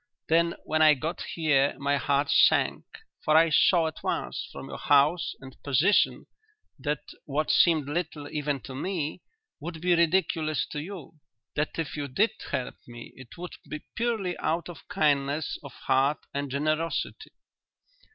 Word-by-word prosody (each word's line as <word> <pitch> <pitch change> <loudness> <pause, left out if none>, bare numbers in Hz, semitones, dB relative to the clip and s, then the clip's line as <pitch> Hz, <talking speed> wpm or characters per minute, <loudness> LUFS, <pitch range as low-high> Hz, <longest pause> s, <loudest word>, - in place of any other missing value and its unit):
Then 170 +1 +3
when 155 0 0
I 155 -1 +7
got 160 +6 -4
here 150 -4 +1
my 140 +1 +1
heart 140 +1 +1
sank, - - +4 0.4
for 155 0 +4
I 165 0 +5
saw 170 +3 +5
at 160 - -5
once - - -3
from - - -8
your - - -7
house 145 +5 +3
and 130 -1 -12
position 145 +9 +2 0.5
that 145 +2 -2 0.2
what 150 +2 0
seemed 160 -5 +4
little 150 -1 -3
even 145 -2 -2
to 135 - -9
me 160 +2 -3 0.4
would 160 +2 -6
be 180 +2 +2
ridiculous 165 -2 +2
to 150 - -3
you 165 -3 -9 0.4
that 150 +1 -1
if 165 -3 -3
you 145 -2 -3
did 200 - +2 0.2
help 125 - -3
me 120 -1 -10
it 130 -2 -13
would 180 +1 -7 0.2
be 155 - -6
purely 225 -7 -1
out 170 +2 -1
of 170 - -11
kindness 145 0 0
of 140 - -10
heart 135 +3 +1 0.2
and 140 0 -2
generosity." 155 +4 -2
155 Hz, 155 wpm, -27 LUFS, 140-165 Hz, 0.5 s, I